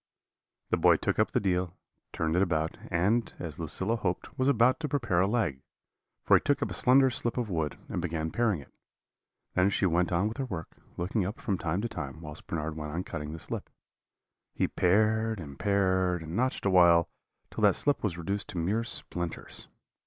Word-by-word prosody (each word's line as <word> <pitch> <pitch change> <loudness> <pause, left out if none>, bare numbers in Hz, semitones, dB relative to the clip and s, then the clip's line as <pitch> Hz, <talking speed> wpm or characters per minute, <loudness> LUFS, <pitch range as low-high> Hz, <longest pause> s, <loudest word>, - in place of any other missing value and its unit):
"The - - +3
boy - - +6
took - - -1
up - - +3
the - - +1
deal, 90 -2 0 0.4
turned 80 0 -1
it 90 - +3
about, 80 -4 0
and, 105 +7 +1
as 80 -3 -6
Lucilla 95 +7 -2
hoped, 90 -4 -3
was 130 - +1
about 125 0 +4
to 155 -2 -3
prepare 115 -11 +1
a 95 - +3
leg; 100 - 0 0.6
for - - +6
he - - +4
took 145 -1 +1
up - - -3
a - - -2
slender 130 +1 +4
slip 120 0 -2
of 120 -5 -2
wood, 80 -4 -1
and - - -3
began 80 -2 -2
paring 110 -9 +1
it. 70 - -17 1.0
She 100 - +1
then 90 - +2
went 90 +1 +2
on 90 +4 +2
with 110 - -5
her 135 - -1
work, 90 -9 -6 0.2
looking 95 +4 0
up 100 +5 -4
from 100 -6 -1
time 85 +4 -1
to 120 - -1
time, 70 - -6
whilst 75 -2 -9
Bernard 80 -1 -3
went 75 -1 -5
on 90 +3 -2
cutting 75 -4 -5
the 80 - -6
slip. - - -5 0.9
He - - +1
pared 110 +3 +2
and 70 -5 -9
pared, 95 -3 +1
and 80 +2 -6
notched 130 +1 0
awhile, 85 -3 +6 0.4
till - - -5
that - - +5
slip 145 - +1
was 95 -5 -1
reduced 100 +4 -3
to - - -7
mere 100 +7 0
splinters. 85 -7 -5
90 Hz, 200 wpm, -29 LUFS, 80-110 Hz, 1.0 s, boy